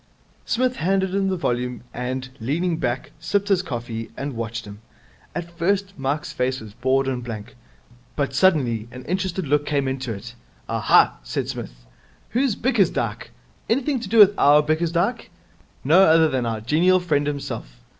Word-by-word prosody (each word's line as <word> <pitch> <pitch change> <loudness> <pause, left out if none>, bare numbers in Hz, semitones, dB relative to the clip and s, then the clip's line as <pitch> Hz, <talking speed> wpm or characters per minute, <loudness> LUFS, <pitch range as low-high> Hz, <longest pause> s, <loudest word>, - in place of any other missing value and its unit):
Psmith 250 +1 0
handed 190 +2 +1
him 195 0 +1
the 190 - -1
volume, 125 -6 -2
and, 130 +1 -4
leaning 160 +8 -1
back, 125 -5 -2
sipped 200 +5 -1
his 190 -2 +3
coffee, 120 -8 -5
and 140 0 -4
watched 115 0 -4
him. 105 +1 -11 0.5
At 170 0 -5
first 195 +3 0
Mike's 150 +2 -2
face 130 -1 -1
was 110 -2 -11
bored 130 +3 +1
and 125 -2 -2
blank, 110 -3 -7 0.6
but 140 -2 -1
suddenly 135 - +2
an 125 0 -10
interested 185 +1 -2
look 145 +1 +2
came 140 -3 0
into 130 -2 -3
it. 110 +3 -7 0.3
'Aha!' - - +3
said - - -3
Psmith. - - -7 0.4
'Who's 250 -2 +1
Bickersdyke? 195 - 0 0.4
Anything 265 +3 +1
to 225 -5 -7
do 230 - +1
with 205 -2 +9
our 145 +1 +6
Bickersdyke?' 165 +3 0 0.5
'No 165 +7 +6
other 160 -3 +6
than 130 -4 -1
our 110 -1 -2
genial 170 +10 +3
friend 145 -5 0
himself.' 100 - -5
145 Hz, 160 wpm, -23 LUFS, 120-185 Hz, 0.6 s, with